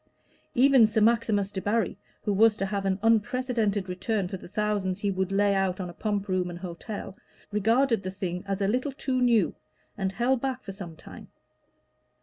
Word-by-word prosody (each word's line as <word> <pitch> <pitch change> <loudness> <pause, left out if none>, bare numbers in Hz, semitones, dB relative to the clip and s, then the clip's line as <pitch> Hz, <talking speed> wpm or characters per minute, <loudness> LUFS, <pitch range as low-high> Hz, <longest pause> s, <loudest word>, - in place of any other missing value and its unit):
Even 260 -2 +6
Sir 215 0 0
Maximus 215 -3 +2
Debarry, 205 +1 0 0.3
who 205 - 0
was 215 +1 +5
to 195 - -1
have 195 0 -2
an 190 -1 +1
unprecedented 225 -2 +1
return 185 +2 -1
for 185 - -5
the - - -12
thousands 200 -1 -1
he 205 - +1
would 190 0 -1
lay 200 +1 +3
out 195 -1 0
on 180 -2 -4
a - - -15
pump 205 0 -2
room 185 -2 0
and 175 - -7
hotel, 185 +3 -7 0.4
regarded 225 +3 +2
the 185 - -4
thing 185 -2 -4
as 195 0 -2
a - - +2
little 255 +6 0
too 255 -2 -1
new, 235 -7 +3 0.4
and 195 -2 -2
held 245 +4 +1
back 265 -1 -2
for 195 - -6
some 190 -4 -8
time. - - -12
205 Hz, 185 wpm, -27 LUFS, 190-225 Hz, 0.4 s, Even